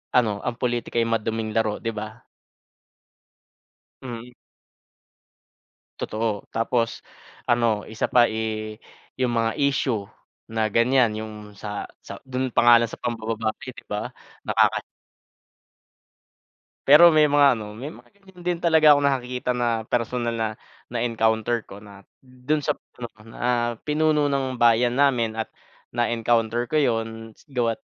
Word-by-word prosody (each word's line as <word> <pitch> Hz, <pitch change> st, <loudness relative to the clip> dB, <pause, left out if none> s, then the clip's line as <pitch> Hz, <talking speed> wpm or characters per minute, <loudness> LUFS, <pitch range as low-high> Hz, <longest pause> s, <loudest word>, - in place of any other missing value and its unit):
ano 110 Hz, -5 st, +2 dB
ang 120 Hz, -1 st, -3 dB
politika 120 Hz, -1 st, -1 dB
ay 115 Hz, -, +1 dB
maduming 115 Hz, -1 st, -1 dB
laro, 110 Hz, -2 st, 0 dB
'di 115 Hz, -, -2 dB
ba? 110 Hz, +2 st, -7 dB, 1.8 s
Mm. 120 Hz, 0 st, -8 dB, 1.7 s
Totoo, 110 Hz, -2 st, -2 dB
tapos 115 Hz, 0 st, 0 dB, 0.5 s
ano 115 Hz, -3 st, +1 dB
isa 110 Hz, -1 st, -2 dB
pa, 120 Hz, -1 st, +6 dB
eh, 110 Hz, -1 st, -4 dB, 0.4 s
yung 125 Hz, -2 st, 0 dB
mga 115 Hz, 0 st, 0 dB
issue 130 Hz, -6 st, +1 dB, 0.5 s
na 110 Hz, -1 st, +1 dB
ganyan 115 Hz, 0 st, +3 dB
yung 110 Hz, 0 st, -6 dB, 0.2 s
sa 105 Hz, +1 st, -5 dB, 0.2 s
sa 100 Hz, -, -8 dB
dun 130 Hz, -1 st, -2 dB
pa -, -, +4 dB
nga 120 Hz, -, +10 dB
lang 115 Hz, -, -3 dB
sa -, -, -9 dB
pambababae, 115 Hz, +1 st, -3 dB
'di -, -, -12 dB
ba? 105 Hz, 0 st, -3 dB, 0.3 s
Nakaka -, -, +3 dB, 2.1 s
Pero 155 Hz, +5 st, +9 dB
may 155 Hz, -1 st, +5 dB
mga 145 Hz, -3 st, +4 dB
ano 105 Hz, -1 st, -7 dB
may 130 Hz, +7 st, -7 dB
mga -, -, -14 dB
ganyan 190 Hz, -3 st, -18 dB
din 175 Hz, -1 st, 0 dB
talaga 160 Hz, -3 st, +6 dB
akong 145 Hz, 0 st, +2 dB
nakakita 125 Hz, -1 st, -2 dB
na 115 Hz, -2 st, 0 dB
personal 120 Hz, 0 st, -1 dB
na 110 Hz, -1 st, 0 dB, 0.4 s
na-encounter 115 Hz, -1 st, 0 dB
ko 100 Hz, +1 st, -12 dB
na 100 Hz, -2 st, -14 dB, 0.2 s
dun 130 Hz, +4 st, -3 dB
sap 150 Hz, 0 st, -1 dB, 0.2 s
pinuno 120 Hz, -3 st, -10 dB
na 120 Hz, +1 st, -1 dB
pinuno 155 Hz, 0 st, +1 dB
ng 135 Hz, -2 st, -1 dB
bayan 120 Hz, +1 st, +4 dB
namin 125 Hz, -5 st, +2 dB
at 110 Hz, 0 st, -4 dB, 0.4 s
na-encounter 120 Hz, 0 st, 0 dB
ko 155 Hz, -, +1 dB
yun 115 Hz, -4 st, -1 dB, 0.2 s
gawa't 120 Hz, -4 st, -1 dB
120 Hz, 135 wpm, -24 LUFS, 110-130 Hz, 2.1 s, nga